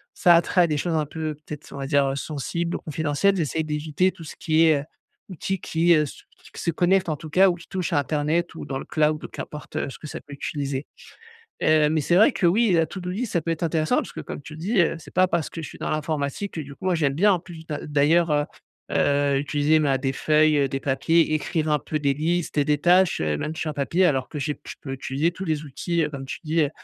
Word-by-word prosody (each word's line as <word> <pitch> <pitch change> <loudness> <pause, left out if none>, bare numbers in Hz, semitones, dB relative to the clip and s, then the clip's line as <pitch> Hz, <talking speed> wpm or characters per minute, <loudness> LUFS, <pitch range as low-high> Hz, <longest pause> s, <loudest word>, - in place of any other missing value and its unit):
ça 175 - +5
a - - +7
attrait 180 +2 +2
à - - +3
des 155 - -1
choses 170 +3 -1
un 155 -1 +1
peu, 155 +1 -4
peut-être 150 0 -10
on - - -8
va 135 0 -4
dire, 140 -1 +3
heu, 135 - -1
sensibles 170 +4 -3
ou - - -3
confidentielles, 160 +5 0
j'essaye 160 -1 -1
d'éviter 155 +4 0
tout 165 - -12
ce - - -9
qui 160 0 +3
est, 150 -3 +3
heu, - - -8 0.5
outil 190 +1 -3
qui, 170 0 +2
heu, 150 -1 +3
se 140 - -11 0.3
se 170 - -1
connecte 180 +2 +2
en 155 - 0
tout 155 - -9
cas, 190 +5 +5
ou 175 - 0
qui 170 -1 -14
touche 185 -3 -3
à 145 - +4
internet 155 +4 -1
ou - - -7
dans 135 -1 -4
le - - -8
cloud 155 0 0
qu'importe, 150 - -8
heu, - - -1
ce - - -10
que - - -8
ça - - -6
peut 145 - -12
utiliser. 140 -1 -4 0.8
Heu, 155 -1 +4
mais 155 +1 +1
c'est 170 +4 +2
vrai 220 +8 +6
que 180 - +1
oui, 210 +4 +3
la 165 -2 +3
to-do 180 +2 -6
list, 220 +5 -3
ça 170 - +2
peut 165 - -3
être 165 0 -3
intéressant, 155 -1 +1
parce - - -2
que - - -6
comme - - -7
tu 150 - -11
le - - -10
dis, 195 +5 +1
heu, 170 - +2
c'est - - -14
pas 185 0 +4
parce 170 -4 -1
que 165 - -6
je - - -6
suis - - -12
dans - - -3
l'informatique 155 +4 -2
que 160 - -3
du 140 -1 -8
coup, - - -13
moi 185 - +2
j'aime 145 -5 +1
bien 200 +7 +4
en 180 - 0
plus 165 -2 -12
d'a 150 -2 -5
d'ailleurs, 155 +3 +3
heu 145 0 +2 0.5
heu, 140 -1 +2
utiliser 145 +2 +2
ma 140 -3 +2
des 135 0 -1
feuilles, 155 +2 +3
heu, 140 -1 +2
des 135 +1 -3
papiers, 155 +4 +2
écrire 155 0 -1
un 150 - +3
peu 155 - -3
des 140 -2 +1
listes 165 +4 -1
et 145 - +4
des 150 0 +1
tâches, 180 +3 +4
heu, 75 -1 0
même 155 +1 -4
sur 155 - -2
un - - -7
papier, 165 +6 +2
alors 135 -6 0
que 150 - -6
j'ai 150 +1 -2
p - - -26
je - - -6
peux 135 - -6
utiliser 135 +5 -1
tous 185 +2 -6
les 155 -2 -1
outils 165 +4 -1
comme 135 -1 -6
tu - - -5
dis, 160 +2 +1
heu 145 - 0
155 Hz, 275 wpm, -24 LUFS, 145-170 Hz, 0.8 s, a